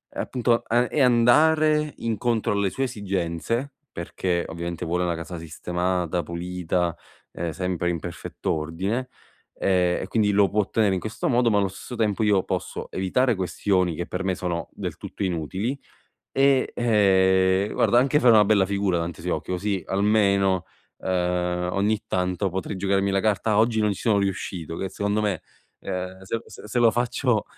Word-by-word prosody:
appunto 120 Hz, -2 st, 0 dB
è 115 Hz, -, -1 dB
a 125 Hz, +1 st, +3 dB
è 150 Hz, -, 0 dB
andare 150 Hz, +5 st, +4 dB
incontro 115 Hz, -1 st, 0 dB
alle 100 Hz, -1 st, +1 dB
sue 135 Hz, -, -2 dB
esigenze, 100 Hz, +3 st, -2 dB, 0.2 s
perché 85 Hz, +1 st, -2 dB
ovviamente 85 Hz, +1 st, -5 dB
vuole 90 Hz, +2 st, 0 dB
una 85 Hz, -1 st, 0 dB
casa 85 Hz, +2 st, -6 dB
sistemata, 90 Hz, +2 st, -2 dB
pulita, 85 Hz, 0 st, -2 dB, 0.4 s
e 85 Hz, -1 st, -4 dB
sempre 90 Hz, +1 st, -2 dB
in 85 Hz, -1 st, -1 dB
perfetto 85 Hz, +1 st, -5 dB
o,rdine, 95 Hz, +11 st, -2 dB, 0.5 s
ehm, 90 Hz, -2 st, +1 dB
e -, -, -6 dB
quindi 105 Hz, -2 st, +2 dB
lo 100 Hz, 0 st, +4 dB
può 105 Hz, +1 st, +2 dB
ottenere 105 Hz, 0 st, +1 dB
in 95 Hz, -, -1 dB
questo 110 Hz, -, -3 dB
modo, 120 Hz, -2 st, +3 dB
ma 105 Hz, -, +3 dB
allo 100 Hz, -1 st, +2 dB
stesso 95 Hz, +6 st, -8 dB
tempo 110 Hz, -1 st, +1 dB
io 100 Hz, -3 st, +3 dB
posso -, -, -4 dB
evitare 115 Hz, +6 st, +1 dB
questioni 90 Hz, -1 st, 0 dB
che 85 Hz, +2 st, -4 dB
per 95 Hz, +1 st, -4 dB
me 95 Hz, -, 0 dB
sono 85 Hz, -3 st, -3 dB
del -, -, -5 dB
tutto 100 Hz, -, -6 dB
inutili 95 Hz, -, -2 dB, 0.6 s
e, 135 Hz, -1 st, +3 dB
ehm, 95 Hz, -3 st, +3 dB
guarda 120 Hz, -, +3 dB
anche 135 Hz, +3 st, +3 dB
fare 125 Hz, -4 st, +6 dB
una 105 Hz, -2 st, +7 dB
bella 100 Hz, -2 st, +3 dB
figura 100 Hz, -2 st, 0 dB
davanti 85 Hz, 0 st, -3 dB
ai 85 Hz, -, -9 dB
suoi 90 Hz, -, +1 dB
occhi 75 Hz, -, -11 dB
così 100 Hz, +1 st, -1 dB
almeno, 100 Hz, -2 st, +2 dB, 0.3 s
uhm, 90 Hz, -1 st, -1 dB
ogni 105 Hz, +2 st, +1 dB
tanto 90 Hz, +2 st, 0 dB
potrei 95 Hz, +3 st, -4 dB
giocarmi 100 Hz, +1 st, +1 dB
la 95 Hz, -, +2 dB
carta 105 Hz, +1 st, +1 dB
oggi 110 Hz, 0 st, +3 dB
non 105 Hz, -1 st, +2 dB
ci 95 Hz, -, -7 dB
sono 110 Hz, -3 st, +3 dB
riuscito, 90 Hz, -4 st, -3 dB
che 95 Hz, -, -3 dB
secondo 100 Hz, +3 st, -1 dB
me, 100 Hz, -5 st, -1 dB, 0.4 s
uhm, 90 Hz, +1 st, -5 dB
se 110 Hz, +4 st, -3 dB
se -, -, -12 dB
se 120 Hz, -, -1 dB
lo 115 Hz, -1 st, +6 dB
faccio 120 Hz, +1 st, 0 dB
95 Hz, 175 wpm, -24 LUFS, 90-110 Hz, 0.6 s, una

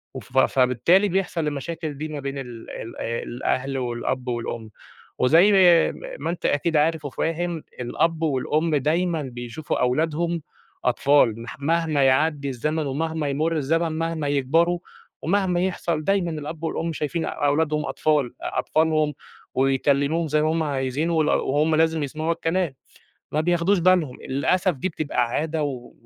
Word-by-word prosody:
وف 130 Hz, +1 st, -7 dB
فبالتالي 130 Hz, -, +4 dB
بيحصل 175 Hz, -4 st, -1 dB
المشاكل 150 Hz, +1 st, -4 dB
دي 155 Hz, -, -4 dB
ما 150 Hz, -, -5 dB
بين 140 Hz, 0 st, -4 dB
ال 120 Hz, -4 st, -9 dB
ال 115 Hz, -, -7 dB
آآ، 115 Hz, +1 st, -2 dB
الأهل 130 Hz, +2 st, -2 dB
والأب 125 Hz, +1 st, -3 dB
والأم، 115 Hz, -2 st, -4 dB, 0.5 s
وزَي 165 Hz, +10 st, +6 dB, 0.4 s
م -, -, -12 dB, 0.2 s
ما -, -, -1 dB
أنت 170 Hz, 0 st, -4 dB
أكيد 155 Hz, +2 st, +1 dB
عارف 155 Hz, 0 st, +1 dB
وفاهم، 165 Hz, +3 st, -2 dB, 0.2 s
الأب 160 Hz, +6 st, 0 dB
والأم 155 Hz, +2 st, +1 dB
دايمًا 165 Hz, +3 st, +1 dB
بيشوفوا 120 Hz, +4 st, -4 dB
أولادهم 160 Hz, +6 st, 0 dB, 0.4 s
أطفال، 125 Hz, -3 st, +3 dB
مح 120 Hz, +4 st, -9 dB
مهما 155 Hz, -1 st, +1 dB
يعدّي 140 Hz, +1 st, +2 dB
الزمن 150 Hz, +5 st, -2 dB
ومهما 160 Hz, +2 st, -2 dB
يمُرّ 155 Hz, +4 st, 0 dB
الزمن، 165 Hz, +3 st, +1 dB
مهما 165 Hz, -2 st, -2 dB
يكبروا، 160 Hz, +6 st, +2 dB, 0.4 s
ومهما 180 Hz, 0 st, +1 dB
يحصل، 170 Hz, -4 st, -1 dB
دايمًا 195 Hz, -4 st, +1 dB
الأب 155 Hz, +1 st, -6 dB
والأم 165 Hz, 0 st, -2 dB
شايفين 160 Hz, +2 st, -2 dB
أولادهم 150 Hz, +1 st, 0 dB
أطفال، 150 Hz, -5 st, +1 dB
أطفالهم، 155 Hz, -1 st, +1 dB, 0.4 s
ويكلموهم 140 Hz, +4 st, +2 dB
زي 150 Hz, 0 st, +2 dB
ما 155 Hz, -, +2 dB
هم 165 Hz, 0 st, 0 dB
عايزين، 140 Hz, +2 st, -1 dB
وال 160 Hz, -2 st, +2 dB
وهم 150 Hz, +3 st, +2 dB
لازم 160 Hz, -1 st, +2 dB
يسمعوا 155 Hz, +4 st, -2 dB
الكلام، 165 Hz, -3 st, -1 dB, 0.6 s
ما 150 Hz, -, +1 dB
بياخدوش 175 Hz, +3 st, +2 dB
بالهم 170 Hz, -7 st, +2 dB
للأسف، 180 Hz, +6 st, +1 dB
دي 135 Hz, +8 st, -2 dB
بتبقى 145 Hz, -7 st, -1 dB
عادة 155 Hz, +4 st, -1 dB
و 130 Hz, -4 st, -5 dB
155 Hz, 145 wpm, -24 LUFS, 135-165 Hz, 0.6 s, وزَي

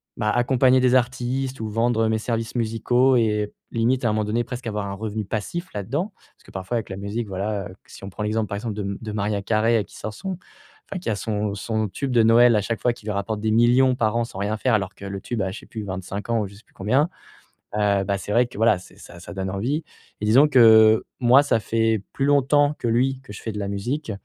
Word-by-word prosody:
bah, 105 Hz, -, -1 dB
accompagner 130 Hz, +1 st, +3 dB
des 125 Hz, 0 st, +3 dB
artistes 130 Hz, +1 st, -1 dB
ou 110 Hz, -, -3 dB
vendre 115 Hz, +1 st, +1 dB
mes 110 Hz, 0 st, +1 dB
services 115 Hz, +1 st, -3 dB
musicaux 120 Hz, +3 st, +2 dB
et 105 Hz, -2 st, +1 dB, 0.2 s
limite 120 Hz, +2 st, +1 dB
à -, -, +3 dB
un -, -, +1 dB
moment 110 Hz, 0 st, 0 dB
donné 115 Hz, +3 st, -1 dB
presque 125 Hz, -1 st, -6 dB
avoir 105 Hz, -2 st, -3 dB
un 100 Hz, -, -4 dB
revenu 105 Hz, +1 st, -4 dB
passif 110 Hz, -, -4 dB
là-dedans 140 Hz, -, -3 dB
parce -, -, -28 dB
que -, -, -15 dB
parfois 95 Hz, +5 st, -4 dB
avec 115 Hz, -, -4 dB
la 95 Hz, -, -5 dB
musique, 100 Hz, +4 st, -4 dB
voilà, 100 Hz, +1 st, -3 dB, 0.2 s
que -, -, -21 dB
si 95 Hz, -, -10 dB
on -, -, -6 dB
prend 105 Hz, -, -6 dB
l'exemple 105 Hz, +1 st, -1 dB
par 100 Hz, -, -4 dB
exemple 105 Hz, 0 st, -4 dB
de 105 Hz, -, -3 dB
m 100 Hz, 0 st, -4 dB
de 110 Hz, -2 st, -5 dB
Mariah 105 Hz, -1 st, -1 dB
Carey 110 Hz, +2 st, +2 dB
qui -, -, -15 dB
sort 110 Hz, -, -5 dB
son 190 Hz, -, -5 dB, 0.5 s
enfin, 190 Hz, -, -4 dB
qui 175 Hz, -, -4 dB
a 110 Hz, -, 0 dB
son 105 Hz, 0 st, -2 dB
son 110 Hz, +1 st, -2 dB
tube 135 Hz, +7 st, -4 dB
de 120 Hz, -2 st, +4 dB
Noël 115 Hz, +1 st, +6 dB
à 105 Hz, -, +2 dB
chaque 115 Hz, +2 st, -3 dB
fois 120 Hz, -, +1 dB
qui 110 Hz, -, -17 dB
lui 105 Hz, -, -2 dB
rapporte 105 Hz, +1 st, -3 dB
des 110 Hz, 0 st, 0 dB
millions 120 Hz, +3 st, +4 dB
par 110 Hz, -2 st, 0 dB
an 120 Hz, -, +2 dB
sans 105 Hz, -4 st, -8 dB
rien 105 Hz, +2 st, -1 dB
faire 125 Hz, +2 st, 0 dB
alors 100 Hz, -3 st, 0 dB
que -, -, -14 dB
le 100 Hz, 0 st, -5 dB
tube 115 Hz, +2 st, -4 dB
a, 95 Hz, -1 st, -1 dB
je 100 Hz, -, -8 dB
sais -, -, -15 dB
plus 110 Hz, -2 st, -7 dB
25 95 Hz, +2 st, -6 dB
ans 115 Hz, -1 st, +2 dB
ou 105 Hz, -, -2 dB
je 100 Hz, -, -14 dB
sais 110 Hz, -, -17 dB
plus -, -, -32 dB
combien, 130 Hz, -, +1 dB, 0.7 s
heu, 100 Hz, -2 st, +2 dB
bah, 100 Hz, 0 st, -1 dB
c'est 105 Hz, -, -5 dB
vrai 120 Hz, +3 st, +4 dB
que, 120 Hz, -, -13 dB
voilà, 110 Hz, -2 st, +3 dB
c'est 90 Hz, -, -16 dB
ça 85 Hz, -, -13 dB
ça -, -, -9 dB
donne 95 Hz, 0 st, -3 dB
envie 125 Hz, +11 st, -2 dB, 0.4 s
et 105 Hz, -, -3 dB
disons 130 Hz, +8 st, +5 dB
que, 110 Hz, -4 st, +6 dB, 0.2 s
moi, 125 Hz, +3 st, +6 dB
ça 115 Hz, -5 st, +2 dB
fait 110 Hz, 0 st, 0 dB
plus 135 Hz, -, -2 dB
longtemps 145 Hz, +1 st, +3 dB
que 120 Hz, -, -1 dB
lui 130 Hz, +3 st, +1 dB
que 135 Hz, -, -11 dB
je 105 Hz, -, -9 dB
fais 110 Hz, -, -5 dB
de 105 Hz, -, -5 dB
la 100 Hz, -, -3 dB
musique 120 Hz, +8 st, -3 dB
110 Hz, 260 wpm, -23 LUFS, 105-120 Hz, 0.7 s, Noël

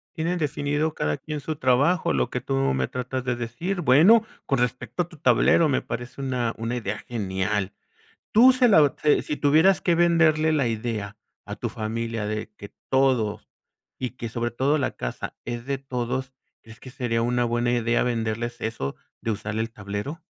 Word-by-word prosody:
Tienen 175 Hz, +2 st, -1 dB
definido 150 Hz, 0 st, -1 dB
cada 75 Hz, 0 st, -1 dB
quien 150 Hz, -1 st, -5 dB
su 155 Hz, +2 st, -4 dB
trabajo, 140 Hz, +6 st, +2 dB
lo 65 Hz, -2 st, 0 dB
que -, -, -2 dB
tú -, -, -4 dB, 0.2 s
me 65 Hz, -1 st, 0 dB
tratas 125 Hz, 0 st, -4 dB
de 125 Hz, -1 st, -1 dB
decir. 165 Hz, +11 st, -3 dB
Bueno, 170 Hz, -, +6 dB, 0.2 s
con 135 Hz, -3 st, 0 dB
respecto 125 Hz, +2 st, -1 dB
a 175 Hz, -, -13 dB
tu 165 Hz, -, -14 dB
tablero 160 Hz, +1 st, +4 dB
me 135 Hz, -, +1 dB
parece 125 Hz, +3 st, -6 dB
una 125 Hz, -3 st, -1 dB
una 115 Hz, +2 st, -3 dB
idea 105 Hz, -3 st, -3 dB
genial. 100 Hz, -2 st, -2 dB, 0.6 s
Tú 245 Hz, +4 st, +7 dB
se 255 Hz, -1 st, +3 dB
la 195 Hz, -8 st, +7 dB
o 145 Hz, -, +2 dB
si 150 Hz, -1 st, +4 dB
si 150 Hz, -, -3 dB
tuvieras 160 Hz, +6 st, +4 dB
que 170 Hz, -2 st, +2 dB
venderle 165 Hz, -2 st, +4 dB
la 140 Hz, -6 st, +2 dB
idea 110 Hz, -2 st, -3 dB, 0.3 s
a 105 Hz, 0 st, -7 dB
tu 120 Hz, -, -3 dB
familia 115 Hz, 0 st, -3 dB
de 110 Hz, +1 st, -3 dB
que 100 Hz, 0 st, -10 dB, 0.2 s
todos, 130 Hz, -6 st, +1 dB, 0.5 s
y 125 Hz, -2 st, -3 dB
que 120 Hz, -2 st, -7 dB
sobre 120 Hz, +1 st, -3 dB
todo 140 Hz, +5 st, +1 dB
la 140 Hz, -, -1 dB
casa -, -, -5 dB
es 120 Hz, 0 st, -5 dB
de 140 Hz, 0 st, -1 dB
todos, 130 Hz, 0 st, -3 dB, 0.3 s
¿crees 115 Hz, 0 st, -14 dB
que 130 Hz, -, -11 dB
sería 120 Hz, -2 st, -1 dB
una 120 Hz, +1 st, +1 dB
buena 120 Hz, +1 st, 0 dB
idea 120 Hz, 0 st, +1 dB
venderles 120 Hz, 0 st, -2 dB
eso 110 Hz, -, -3 dB, 0.3 s
de 115 Hz, -, -1 dB
usar 110 Hz, +1 st, -4 dB
el 115 Hz, 0 st, -2 dB
tablero? 105 Hz, +11 st, -5 dB
125 Hz, 185 wpm, -25 LUFS, 115-145 Hz, 0.6 s, Tú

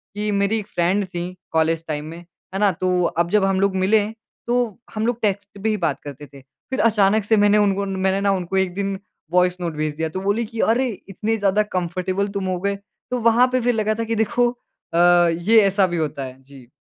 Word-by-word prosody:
कि 210 Hz, 0 st, -1 dB
मेरी 200 Hz, +2 st, +1 dB
एक 205 Hz, -, -8 dB
फ्रेंड 185 Hz, +4 st, 0 dB
थीं 180 Hz, 0 st, -5 dB, 0.2 s
कॉलेज 160 Hz, 0 st, +1 dB
टाइम 150 Hz, -1 st, -3 dB
में, 165 Hz, +2 st, -8 dB
है 180 Hz, +2 st, -10 dB
ना 205 Hz, -2 st, +4 dB
तो 180 Hz, +1 st, 0 dB
अब 170 Hz, +1 st, 0 dB
जब 210 Hz, 0 st, +3 dB
हम 190 Hz, -1 st, +1 dB
लोग 195 Hz, -1 st, +1 dB
मिले 205 Hz, +3 st, +3 dB, 0.4 s
तो 240 Hz, -2 st, 0 dB, 0.2 s
हम 215 Hz, +1 st, -1 dB
लोग 240 Hz, -1 st, -1 dB
टेक्स्ट 200 Hz, -1 st, -2 dB
पे 220 Hz, -, +2 dB
ही 215 Hz, -, 0 dB
बात 170 Hz, -, -1 dB
करते 145 Hz, 0 st, -9 dB
थे। 140 Hz, -1 st, -15 dB
फ़िर 145 Hz, -, -8 dB
अचानक 215 Hz, -1 st, +3 dB
से 220 Hz, +1 st, +2 dB
मैंने 205 Hz, 0 st, +4 dB
उन 200 Hz, -2 st, +2 dB
उन 195 Hz, -1 st, -2 dB
मैंने 190 Hz, +1 st, +1 dB
ना 200 Hz, 0 st, +2 dB
उनको 185 Hz, 0 st, -2 dB
एक 190 Hz, -2 st, +1 dB
दिन 195 Hz, 0 st, -3 dB, 0.3 s
वॉइस 180 Hz, 0 st, +2 dB
नोट 170 Hz, -2 st, -2 dB
भेज 155 Hz, 0 st, -2 dB
दिया, 160 Hz, 0 st, -2 dB
तो 185 Hz, -, -5 dB
बोली 205 Hz, +4 st, 0 dB
कि 225 Hz, +1 st, -9 dB
अरे! 250 Hz, +3 st, +2 dB, 0.2 s
इतनी 220 Hz, +4 st, -2 dB
ज़्यादा 205 Hz, +1 st, +2 dB
कंफ़र्टेबल 185 Hz, +1 st, -2 dB
तुम 190 Hz, -, -2 dB
हो 185 Hz, -1 st, -1 dB
गए। 200 Hz, 0 st, 0 dB, 0.4 s
तो 250 Hz, -, 0 dB
वहाँ 235 Hz, +2 st, +4 dB
पे 255 Hz, -1 st, +1 dB
फ़िर 245 Hz, +1 st, +2 dB
लगा 215 Hz, 0 st, +1 dB
था -, -, 0 dB
कि 230 Hz, 0 st, -2 dB
देखो 235 Hz, +3 st, +2 dB, 0.4 s
अ, -, -, 0 dB, 0.3 s
ये 180 Hz, +7 st, +4 dB
ऐसा 195 Hz, 0 st, +3 dB
भी 175 Hz, -, -3 dB
होता 150 Hz, -3 st, -2 dB
है। 130 Hz, 0 st, -9 dB
जी। 135 Hz, -2 st, -16 dB
195 Hz, 230 wpm, -21 LUFS, 175-215 Hz, 0.4 s, ना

